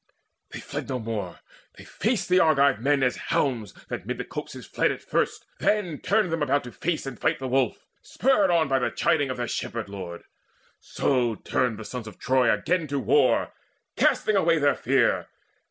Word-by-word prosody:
They - - -7
fled - - -6
no 130 - -1
more, 110 -6 -5 0.4
they - - -11
faced 225 0 -1
the 180 0 +4
Argive 140 -6 +4
men, 140 +2 +2
As 125 - +1
hounds, 125 - 0 0.2
that - - -4
mid - - -3
the - - -4
copses - - -7
fled - - +1
at - - -7
first, - - -1
Turn 185 -8 0 0.3
them 165 -1 -1
about 145 0 +1
to 125 - -9
face 165 +3 -2
and 135 -5 -7
fight - - +1
the 135 - -5
wolf, 130 -3 0 0.2
Spurred 225 -7 +2 0.2
by 135 -1 +2
the 125 - 0
chiding 160 -5 +1
of 130 - -3
their 120 -1 -2
shepherd 115 -2 -4
lord; 90 -4 -7 0.6
So 125 -4 0
turned 120 +1 -1
the 110 - -8
sons 125 -2 -6
of 110 - -10
Troy 130 -2 +2
again 160 - 0
to 140 0 -2
war, 130 +2 +2 0.4
Casting 215 - +2
away 170 -4 +3
their 145 -2 +3
fear. - - +1
135 Hz, 185 wpm, -25 LUFS, 120-160 Hz, 0.6 s, the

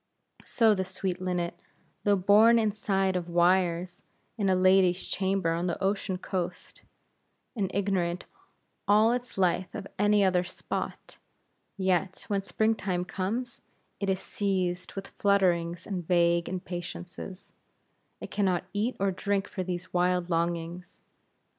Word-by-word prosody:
So 225 -3 +4
the 190 -2 0
sweet 185 -1 -3
linnet, 180 -2 -2 0.5
though 205 -1 +5
born 210 +5 +6
inside 200 -3 +1
of 175 -1 -2
wires 175 0 +2 0.3
in 205 -4 0
a 185 - +4
lady's 185 -1 +4
chamber 190 -3 0
on 170 +2 -1
the 170 - -1
ocean 195 -1 -1
coast, 180 -1 -5 0.7
and 200 -5 -1
ignorant 185 -3 -1 0.6
all 215 +3 +5
its 245 -2 -3
life 185 0 +1
of 205 -3 -5
any 205 0 +4
other 185 -2 +3
spot; 180 - -6 0.6
yet, 190 -1 0
when 200 -1 +1
spring 220 +3 +1
time 185 -4 -2
comes, 225 +7 -3 0.4
it 200 - -1
is 190 -1 +1
seized 185 -3 -2
with 195 0 -5
flutterings 175 -4 +1
and 180 -5 -4
vague 170 -1 +3
impatiences; 180 +1 -7 0.7
it - - -8
can 205 - +1
not 180 -2 +1
eat 215 +5 0
or 195 0 +2
drink 200 +1 -1
for 190 - -5
these 180 -1 -5
wild 180 0 +1
longings. 170 +1 -2
185 Hz, 135 wpm, -28 LUFS, 175-200 Hz, 0.7 s, born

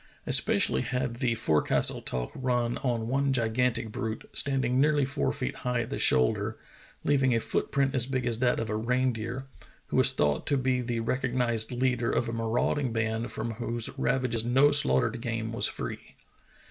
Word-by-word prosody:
Especially - - +4
had 125 -2 -3
the 120 -2 0
forecastle 80 -9 +4
talk 60 -1 -4
run 125 -2 -1
on 120 -4 -2
one 135 +2 0
gigantic 115 -1 0
brute, 110 +1 -5
standing 130 -2 +3
nearly 145 -1 +2
four 135 - -1
feet 60 - -4
high 125 -1 -2
at 115 - -7
the - - -3
shoulder, 65 -1 +2 0.5
leaving 135 -4 +2
a - - +2
foot - - -2
print 140 -1 +1
as 130 -3 +1
big 130 -2 -2
as 115 -2 -1
that 125 -1 +1
of 110 -1 -3
a - - -1
reindeer, 125 +2 -2 0.4
who - - -1
was - - +7
thought 75 -1 -1
to 140 - +1
be 130 -1 0
the 120 -1 -3
recognized 120 -2 -1
leader 125 -1 0
of 120 - 0
a 115 - -4
marauding 115 +4 -1
band 110 +1 -2
from 115 +1 -4
whose 115 +1 -1
ravages 125 -4 0
no 135 +5 +4
slaughtered 120 -5 +2
game 115 -2 -4
was 115 - +2
free. - - -7
120 Hz, 175 wpm, -27 LUFS, 115-130 Hz, 0.5 s, was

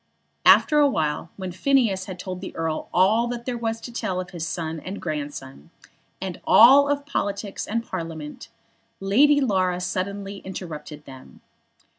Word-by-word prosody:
After 300 -2 +6
a 290 -1 +5
while, 155 - -2
when 185 -2 -5
Phineas 210 -2 +1
had 185 -1 -7
told 185 0 -6
the - - -8
Earl 160 -1 -3
all 210 +6 +3
that 240 0 -5
there 250 - -2
was 225 -1 -2
to 240 - -8
tell 185 -5 -2
of 180 -1 -6
his 165 -2 -4
son 160 -1 -4
and 185 +5 -6
his - - -9
grandson, 145 - -6 0.5
and 185 -1 -6
all 275 +5 +7
of 285 0 -1
politics 200 -7 -3
and 230 +2 -1
of - - -26
Parliament, 165 -4 -6 0.5
Lady 275 +10 +4
Laura 185 -8 +1
suddenly 195 +2 -4
interrupted 155 -6 -8
them. 130 -1 -13
190 Hz, 165 wpm, -24 LUFS, 165-230 Hz, 0.5 s, all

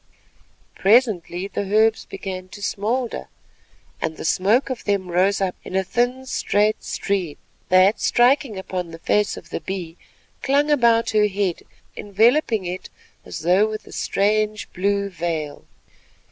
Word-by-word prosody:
Presently 195 -4 +2
the 200 - -3
herbs 215 +3 +2
began 185 -2 -6
to 205 +2 -12
smoulder, 230 +5 -2 0.7
and 160 -1 -2
the - - -6
smoke 215 - +2
of 255 - -5
them 195 -3 -1
rose 190 +3 +2
up 190 -2 0
in 185 - -7
a 190 - +2
thin, 245 +6 -1
straight 215 -4 0
stream, 185 -7 -2 0.3
that, 185 +3 +5
striking 245 -2 +2
upon 185 -2 -4
the 165 - -9
face 205 +5 0
of - - -12
the - - -4
Bee, 180 -3 -6 0.4
clung 285 +2 +2
about 235 -5 +3
her 210 -1 +3
head 195 -3 -2 0.3
enveloping 220 +1 +2
it 180 +1 -5 0.4
as - - -7
though 185 +6 +3
with 215 0 -6
a - - -14
strange 215 +1 0
blue 200 +2 0
veil. 165 -5 -4
200 Hz, 145 wpm, -22 LUFS, 185-225 Hz, 0.7 s, that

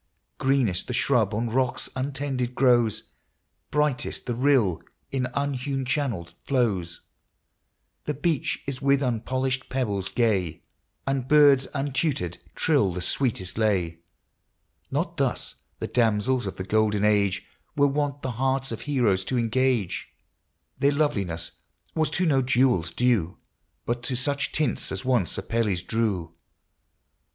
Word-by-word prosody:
Greenest 130 -9 +1
the 125 - -3
shrub 120 -5 +2
on 115 +2 -1
rocks 130 +1 0
untended 130 -2 -2
grows, 120 -4 +2 0.6
Brightest 150 -4 0
the 120 - -1
rill 120 - +2 0.3
in 130 -2 0
unhewn 140 -1 -1
channel 125 - -1 0.2
flows. 100 -11 0 1.0
The 150 - -2
beach 150 +1 -1
is 135 -1 -4
with 140 0 +3
unpolished 130 +2 -1
pebbles 105 -7 -1
gay, 95 -10 0 0.4
And 135 -2 -1
birds 140 -2 +6
untutored 135 - -1 0.2
trill 140 - +2
the 90 - -4
sweetest 105 -2 -1
lay. 90 -7 +1 0.9
Not 165 +5 -2
thus 135 -4 -1 0.2
the - - -4
damsels 120 +1 +1
of 95 - -5
the 95 - -4
golden 105 +1 +2
age 100 -2 +2 0.3
Were 145 - +4
wont 145 0 -1
the 130 - -1
hearts 135 +2 0
of 115 - -5
heroes 120 -10 +1
to 130 - -1
engage: 120 -3 0 0.7
Their 140 +1 +3
loveliness 100 - -1 0.4
was 155 -2 +1
to 175 +4 0
no 140 -5 +3
jewels 125 -9 +2
due, 100 -4 +1 0.5
But 120 0 -1
to 130 - -1
such 140 0 0
tints 155 -1 -1
as - - -4
once 125 -8 +1
Apelles 105 -6 -1
drew. 110 -2 0
LIFE. 80 0 -12
125 Hz, 130 wpm, -26 LUFS, 105-135 Hz, 1.0 s, birds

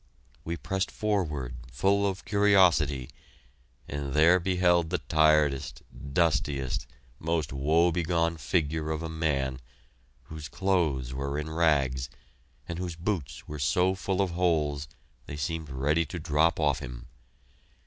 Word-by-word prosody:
We 85 +1 -3
pressed 95 +7 -2
forward, 75 - -2
full 100 +11 +2
of 95 -1 -4
curiosity, 90 - +3 0.8
and 70 -1 -4
there 85 +5 +5
beheld 90 -2 +2
the 90 - 0
tiredest, 75 -2 +2
dustiest, 70 0 -1 0.3
most 80 -3 -1
woe 80 +6 +3
begone 85 -1 0
figure 80 +2 -1
of 80 +1 -2
a 80 - -4
man, 70 -5 -1 0.6
whose 75 +3 -8
clothes 80 -11 0
were 70 +2 -3
in 75 +1 -4
rags, 70 -6 +1 0.6
and 85 0 -5
whose 90 -2 -4
boots 85 - -4
were 75 0 -6
so 90 +7 +2
full 95 0 -1
of 95 - -2
holes 75 -5 0 0.4
they 70 - -6
seemed 80 +1 -3
ready 70 +5 +1
to 90 - -6
drop 80 +1 +1
off 75 -4 +2
him. - - -8
80 Hz, 130 wpm, -28 LUFS, 70-85 Hz, 0.8 s, there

